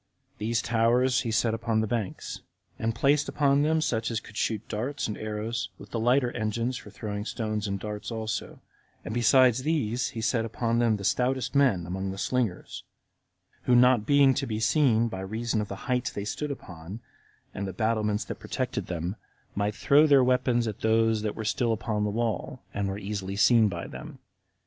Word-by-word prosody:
These 115 +2 0
towers 120 +3 +3
he 120 - -3
set 110 0 +1
upon 115 -1 0
the - - 0
banks, 110 -3 -4 0.4
and 115 0 -1
placed 140 +4 +2
upon 140 -1 +3
them 160 +2 +2
such 115 -7 0
as 115 -2 -1
could 105 - -15
shoot 110 -1 -1
darts 125 +7 -3
and 105 - -3
arrows, 110 +3 -3
with - - -13
the 115 - -2
lighter 125 +2 +3
engines 115 +2 -2
for 105 - -8
throwing 105 0 -5
stones 110 -1 -3
and 100 0 -2
darts 105 +1 -5
also; 110 -2 -4 0.4
and 110 - -4
besides 125 +1 +4
these, 130 -5 0
he - - -1
set 115 0 +1
upon 115 +1 -1
them 115 -3 +3
the 100 - -8
stoutest 125 +5 0
men 130 - +3
among 95 +2 -3
the 95 - -5
slingers, 115 -4 -2 0.8
who 125 - +4
not 125 -3 +5
being 140 -2 +5
to - - -2
be 110 -1 -2
seen 115 -1 +3
by 95 -4 -5
reason 110 +3 -2
of 105 - -4
the 100 - -5
height 125 -1 0
they 100 - -3
stood 150 +7 -3
upon, 90 - -8 0.5
and 100 +1 -4
the - - -3
battlements 110 +1 0
that - - -6
protected - - -3
them, 90 +2 -3 0.4
might 105 +1 -1
throw 145 +6 +5
their 140 -3 +6
weapons 125 -2 +2
at 105 - -4
those 110 0 +2
that 105 -1 -2
were 110 - -5 0.3
upon 110 -1 -1
the - - 0
wall, 115 0 -2
and 100 -1 -1
were 95 0 -3
easily 100 -1 -4
seen 110 +1 +5
by 85 -3 -5
them. - - -9
115 Hz, 190 wpm, -27 LUFS, 105-125 Hz, 0.8 s, their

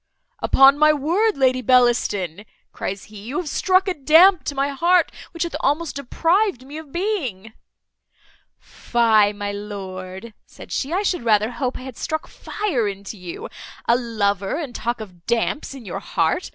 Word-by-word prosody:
"Upon 270 +1 +5
my 305 0 +6
word, 350 +9 +1
Lady 255 -1 +2
Bellaston," 235 -8 +2 0.3
cries 195 +1 -4
he, 210 -2 -12
"you 240 +7 -5
have 360 -4 -3
struck 370 +5 +2
a 375 - +1
damp 320 +3 +5
to 285 - -3
my 275 +1 0
heart, 340 +5 +2 0.2
which 335 - -3
hath 340 - -4
almost 300 +3 0
deprived 330 - 0
me 290 +3 -8
of 310 -3 -13
being." 270 - -3 1.0
"Fie, 220 -4 +2
my 205 0 -4
lord," 195 0 -7
said - - -13
she, 275 - -2
"I 380 +4 0
should 370 -6 0
rather 215 0 +2
hope 250 +1 -3
I - - -10
had 260 -2 -9
struck 315 0 -3
fire 315 - -2
into 200 +1 -6
you. 180 -3 -8 0.4
A 235 - +5
lover, 205 -5 -1
and 295 -7 -5
talk 235 0 -3
of 180 -5 -12
damps 235 +5 -1
in 255 -4 -11
your 180 - -5
heart! - - -1
255 Hz, 165 wpm, -22 LUFS, 210-315 Hz, 1.0 s, my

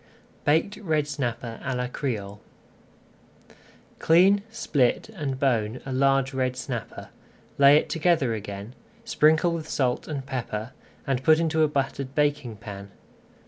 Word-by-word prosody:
BAKED 160 +8 +2
RED 155 -7 0
SNAPPER 120 -5 -4
À 135 -1 -2
LA 125 - -1
CRÉOLE 105 -6 -4 1.6
Clean, 190 +5 +5
split, 155 - 0
and 145 -11 -4
bone 120 -3 0
a 135 - -4
large 135 0 +2
red 130 -1 -1
snapper, 125 - -6 0.5
lay 140 +1 +8
it - - 0
together 160 -7 +1
again, 105 +1 -7 0.3
sprinkle 160 +3 +3
with 165 -2 -5
salt 125 -3 -1
and 140 -4 -4
pepper, 125 -3 -4 0.3
and 135 -2 -1
put 155 +1 +6
into 160 -1 +1
a 155 - +5
buttered 140 -1 -3
baking 145 -5 0
pan. 100 -2 -9
135 Hz, 135 wpm, -25 LUFS, 125-155 Hz, 1.6 s, lay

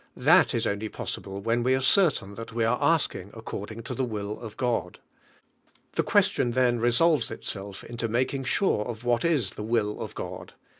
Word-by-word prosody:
That - - +5
is - - 0
only 105 +2 -2
possible 100 -1 -6
when 115 +3 +1
we 130 +2 +3
are - - +1
certain 135 - +3
that 115 +2 -8
we 115 0 0
are 120 +2 +1
asking 150 - +1
according 110 0 -6
to 115 - -5
the 135 - -1
will 105 -3 -4
of 110 -3 -9
God. 120 -2 -1 1.0
The - - +2
question 120 - +2
then 120 -1 +2
resolves 120 +4 +3
itself 100 -3 -6
into 120 -1 -3
making 130 +4 -1
sure 185 - +2
of 115 0 -6
what 120 -1 +1
is 145 - +2
the - - -8
will 110 -2 0
of - - -6
God. - - -7
115 Hz, 185 wpm, -27 LUFS, 105-125 Hz, 1.0 s, That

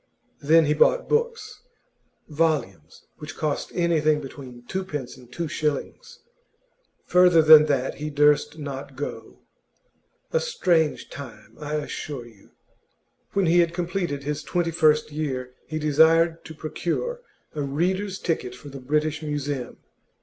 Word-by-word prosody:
Then 160 +3 +5
he 150 - +2
bought - - +3
books 465 +1 -1 0.7
volumes 145 - -2
which 150 +1 -8
cost 155 -3 -2
anything 155 -3 +2
between 130 -3 -10
twopence 155 -9 -4
and 125 -2 -17
two 170 +5 -3
shillings; 150 -2 -4 0.8
further 180 -2 +5
than 155 0 +9
that 135 -2 0
he 155 - -3
durst 150 +1 +2
not 140 -3 -7
go. - - -7 0.9
A 485 - +3
strange 175 - 0
time, 140 -2 -11
I 150 0 -4
assure 145 -3 -5
you. 110 -4 -18 0.8
When 200 -1 +2
he 175 +1 +4
had 170 0 +2
completed 175 -5 -2
his 150 +1 -3
twenty 165 +4 -1
first 155 -2 +3
year, 130 -4 -4
he 155 - -4
desired 160 +2 +3
to 160 - -9
procure 175 - -3 0.3
a 150 - -3
reader's 185 +8 -1
ticket 155 -9 -3
for 145 +3 -11
the 135 -1 -9
British 150 +3 -1
Museum. 145 -4 -4
155 Hz, 135 wpm, -24 LUFS, 145-170 Hz, 0.9 s, than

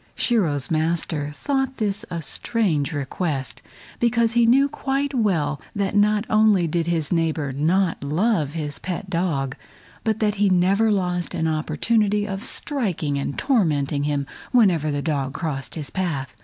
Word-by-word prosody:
Shiro's 170 - +1
master 160 -2 0
thought 270 - -1
this 205 -1 -1
a 170 -2 -4
strange 175 - 0
request, 145 -1 -3 0.4
because 235 -1 +2
he 235 -1 +4
knew 270 +4 +5
quite 280 0 -2
well 165 - 0
that 200 -1 -1
not 210 +1 +3
only 215 -4 +4
did 165 +1 -1
his 165 -4 0
neighbor 160 -4 0
not 165 +5 +1
love 155 0 +1
his 150 -3 -4
pet 185 +1 -5
dog, 155 -7 -1 0.5
but 220 -1 0
that 210 -1 +2
he 205 - +5
never 195 +5 +3
lost 180 -3 -1
an 160 - 0
opportunity 205 +6 +1
of 195 0 -4
striking 190 - -1
and 140 - -3
tormenting 150 - +1
him 145 -1 -1 0.3
whenever 185 - +3
the 145 -1 -2
dog 140 -4 -2
crossed 145 -6 -3
his 150 -4 -5
path. 150 -8 -3
175 Hz, 150 wpm, -23 LUFS, 150-215 Hz, 0.5 s, knew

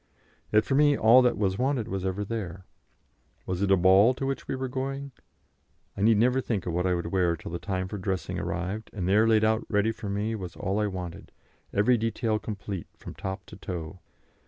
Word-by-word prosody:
Yet 105 0 +4
for - - -1
me 145 0 +4
all 115 +4 +7
that 125 -5 +2
was 95 -1 0
wanted 130 -3 0
was 95 -1 -3
ever 95 +2 -2
there. 95 -4 -5 0.8
Was 90 0 -3
it 100 - +1
a 95 - +5
ball 95 +7 +5
to 135 - -3
which 135 0 -3
we - - -2
were 130 0 -3
going? 135 +2 -4 0.8
I - - -5
need 110 +1 +5
never 125 +4 +3
think 105 -7 -2
of 85 - -2
what 90 +2 0
I 90 - +2
would 85 -1 -4
wear 90 -3 +2
till - - -9
the 85 - -4
time 95 -2 -2
for 100 +2 -6
dressing 95 -2 -2
arrived, 100 +5 -3
and 95 -4 -3
there 105 +4 +4
laid 110 -1 +4
out 110 +1 +2
ready 105 +1 +2
for 110 -2 -7
me 105 +3 -1
was 95 -5 -6
all 95 +3 -1
I 105 - +1
wanted, 90 -3 -6 0.4
every 110 +4 +3
detail 115 -1 0
complete 100 -5 -6
from - - -9
top 95 -1 -5
to 100 - -12
toe. 85 -1 -6
105 Hz, 215 wpm, -27 LUFS, 95-115 Hz, 0.8 s, all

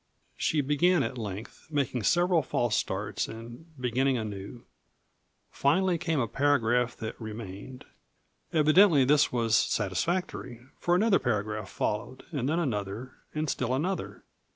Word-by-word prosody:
She 155 - +1
began 150 +4 +3
at 125 +1 -4
length, 105 +1 -7
making 140 -5 -1
several 175 - +3
false 120 -5 0
starts - - -2
and 120 +7 -10
beginning 130 +2 +1
anew. 105 +1 -6 0.9
Finally 175 +5 +2
came 160 -3 0
a 120 - +1
paragraph 125 -2 +2
that 110 +1 -6
remained. 110 +3 -8 0.7
Evidently 155 -1 +5
this 150 +2 +4
was 115 -2 +2
satisfactory, 120 - -1 0.2
for 175 - +2
another 205 +2 +4
paragraph 105 -3 -2
followed; 110 +5 -3
and 140 -4 -1
then 160 - +1
another, 115 - -2 0.2
and 155 +1 -1
still 130 -2 0
another. 180 +8 -3
130 Hz, 130 wpm, -28 LUFS, 110-155 Hz, 0.9 s, Evidently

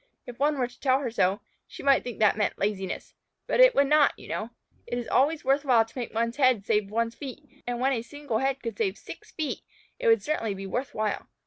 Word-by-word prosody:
If 245 -1 -10
one 295 +1 +2
were 255 - +1
to 245 0 -12
tell 260 -2 +3
her 250 -4 -3
so, 195 -1 +1 0.3
she - - -10
might 275 -1 +4
think 245 -3 -6
that 215 -2 +4
meant 210 -1 -1
laziness, 195 -2 -3 0.3
but - - -1
it - - +7
would 280 - +5
not, 300 +1 +4
you - - -12
know. 220 - -3 0.4
It 240 - -3
is 240 - -4
always 295 +3 +2
worth 275 +2 +2
while 240 -5 +4
to 225 - -21
make 245 -3 -4
one's 230 +2 -1
head 255 -7 +3
save 210 -2 +1
one's 230 +2 -1
feet, 285 +3 -10
and 245 -1 -2
when 265 +2 +2
a 235 - -1
single 275 -2 -4
head 270 0 -1
could 230 -2 -5
save 400 -4 0
six - - -11
feet 310 -3 -4 0.4
it - - -1
would 455 0 +5
certainly 230 -10 -1
be 195 0 -7
worth 250 +7 -4
while. 215 -1 -2
245 Hz, 240 wpm, -27 LUFS, 225-280 Hz, 0.4 s, it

